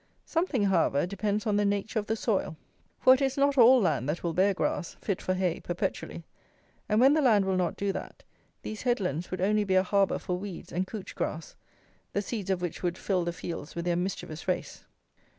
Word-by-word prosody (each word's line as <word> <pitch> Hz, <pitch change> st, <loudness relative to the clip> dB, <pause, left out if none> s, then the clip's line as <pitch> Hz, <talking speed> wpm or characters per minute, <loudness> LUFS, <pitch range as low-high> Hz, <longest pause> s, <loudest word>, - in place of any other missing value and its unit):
Something, 325 Hz, -, 0 dB
however, 170 Hz, -7 st, +2 dB
depends 205 Hz, +2 st, -2 dB
on 210 Hz, -2 st, +1 dB
the 205 Hz, -, +2 dB
nature 205 Hz, +2 st, 0 dB
of 210 Hz, -, -5 dB
the 220 Hz, -, 0 dB
soil: 205 Hz, -8 st, -1 dB, 0.4 s
for 260 Hz, -, +7 dB
it 260 Hz, -, +1 dB
is 270 Hz, 0 st, 0 dB
not 280 Hz, 0 st, +3 dB
all 255 Hz, 0 st, +7 dB
land 150 Hz, -, 0 dB
that 155 Hz, -, -2 dB
will 170 Hz, -1 st, -1 dB
bear 190 Hz, +4 st, +3 dB
grass, 180 Hz, -2 st, -2 dB
fit 200 Hz, -4 st, -2 dB
for 185 Hz, -, -1 dB
hay, 180 Hz, -3 st, 0 dB
perpetually; 175 Hz, 0 st, -4 dB, 0.7 s
and, 210 Hz, 0 st, +3 dB
when 265 Hz, +3 st, +6 dB
the 310 Hz, -, +3 dB
land 215 Hz, -7 st, +4 dB
will 190 Hz, -1 st, +1 dB
not 180 Hz, -2 st, 0 dB
do 200 Hz, 0 st, 0 dB
that, -, -, -8 dB, 0.4 s
these 215 Hz, -1 st, -6 dB
headlands 185 Hz, -, -1 dB
would 185 Hz, -1 st, -4 dB
only 210 Hz, +2 st, +2 dB
be 190 Hz, -2 st, 0 dB
a 185 Hz, -, +5 dB
harbour 195 Hz, +1 st, +2 dB
for 180 Hz, 0 st, -3 dB
weeds 195 Hz, -3 st, -8 dB
and 185 Hz, +2 st, -1 dB
couch 210 Hz, -2 st, -7 dB
grass, 160 Hz, 0 st, -4 dB, 0.6 s
the 200 Hz, -, +1 dB
seeds 205 Hz, -3 st, -4 dB
of 185 Hz, -2 st, 0 dB
which 175 Hz, -, -4 dB
would 175 Hz, 0 st, -1 dB
fill 185 Hz, -3 st, 0 dB
the 170 Hz, -, -1 dB
fields 170 Hz, -3 st, -7 dB
with 170 Hz, 0 st, -3 dB
their 175 Hz, -1 st, +1 dB
mischievous 175 Hz, -3 st, -4 dB
race. 185 Hz, -, -3 dB
195 Hz, 215 wpm, -28 LUFS, 175-215 Hz, 0.7 s, for